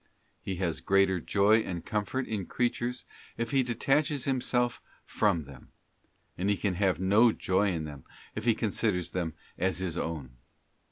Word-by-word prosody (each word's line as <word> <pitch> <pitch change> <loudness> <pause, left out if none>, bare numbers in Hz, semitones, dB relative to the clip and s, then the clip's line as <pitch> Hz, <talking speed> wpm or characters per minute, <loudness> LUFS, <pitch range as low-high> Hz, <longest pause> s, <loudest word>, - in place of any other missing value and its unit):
He 95 - -3
has 85 -3 -1
greater 95 -1 +3
joy 105 +5 +4
and 90 -6 -4
comfort 110 +5 -1
in 100 -5 -3
creatures 120 0 -1 0.3
if 115 +2 -2
he 135 -1 +4
detaches 135 +3 +1
himself 125 -2 0 0.2
from 85 -2 +1
them; 70 -2 -14 0.7
and 95 +3 +1
he 100 - +2
can 95 +2 0
have 95 -2 +1
no 105 +5 +5
joy 95 0 +1
in 80 -3 -2
them 75 -3 -8 0.3
if 110 - -5
he 115 -2 +4
considers 95 -5 0
them 85 -3 -2 0.2
as 95 +1 +1
his 90 -2 -2
own. 70 -7 -5
100 Hz, 160 wpm, -29 LUFS, 85-120 Hz, 0.7 s, no